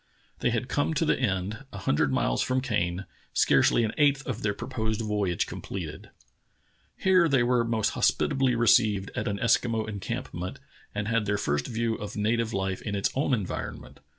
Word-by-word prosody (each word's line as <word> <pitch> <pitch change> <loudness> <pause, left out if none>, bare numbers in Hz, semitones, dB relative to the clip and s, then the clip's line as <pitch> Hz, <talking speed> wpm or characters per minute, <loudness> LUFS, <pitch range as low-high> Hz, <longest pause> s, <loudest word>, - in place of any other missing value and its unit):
They - - +1
had 120 +1 -1
come 145 +4 0
to 160 - +1
the 150 - +2
end, 105 0 -1
a - - -8
hundred 75 -6 +1
miles - - +1
from 130 0 +1
Kane 95 -7 -1
— - - -34
scarcely 120 - +4
an 110 - 0
eighth 140 -2 +3
of 125 -2 -4
their 100 -1 0
proposed 110 -3 -3
voyage 105 -5 0
completed. - - -7 0.9
Here 185 -3 +4
they 135 -4 +3
were 120 0 +3
most 115 -2 +1
hospitably 135 -2 +2
received 110 -4 +3
at - - -2
an 100 -1 -1
Eskimo 115 -1 +1
encampment 100 +1 -5 0.4
and 105 0 -2
had 115 -2 +1
their 100 0 +1
first 75 -6 -1
view 115 0 -1
of 105 0 -7
native 110 +2 +1
hfe 95 -3 -2
in 100 - -3
its 100 - 0
own 135 +2 0
environment. 100 -6 -6
110 Hz, 180 wpm, -27 LUFS, 100-125 Hz, 0.9 s, scarcely